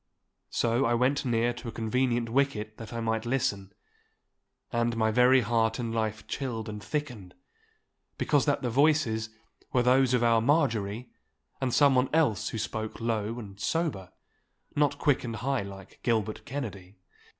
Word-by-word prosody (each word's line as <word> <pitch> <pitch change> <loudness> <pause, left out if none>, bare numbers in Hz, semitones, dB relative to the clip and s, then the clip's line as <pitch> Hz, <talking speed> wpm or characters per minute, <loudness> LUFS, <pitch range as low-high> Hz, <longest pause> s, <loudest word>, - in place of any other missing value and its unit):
So 120 +3 +1
I 120 +1 +2
went 135 +4 +1
near 120 0 +1
to 120 - -9
a - - -3
convenient 120 +1 0
wicket 115 -4 -1
that 115 -2 -9
I 115 -1 -4
might 110 -1 -1
listen, 120 -6 -1 1.0
and 120 0 0
my 110 -1 +2
very 125 +3 +5
heart 115 -1 +1
and 115 -2 -3
life 110 -1 -2
chilled 115 -5 -4
and 105 -1 -6
thickened, 125 - -4 0.8
because 145 -3 +2
that 145 -1 +1
the 120 - -1
voices 125 -5 +2 0.4
were 125 - +2
those 130 0 +4
of 120 - +1
our 115 -1 +4
Marjorie 115 -5 0 0.5
and 130 -2 0
someone 135 -1 +4
else 155 -10 +2
who - - -5
spoke 110 0 -4
low 115 -1 -1
and 100 -4 -9
sober—not 145 - -3
quick 145 -2 +2
and 115 -2 -4
high 130 +4 -1
like 100 -1 -10
Gilbert 110 -3 -1
Kennedy. 105 -8 -6
115 Hz, 150 wpm, -28 LUFS, 110-130 Hz, 1.0 s, very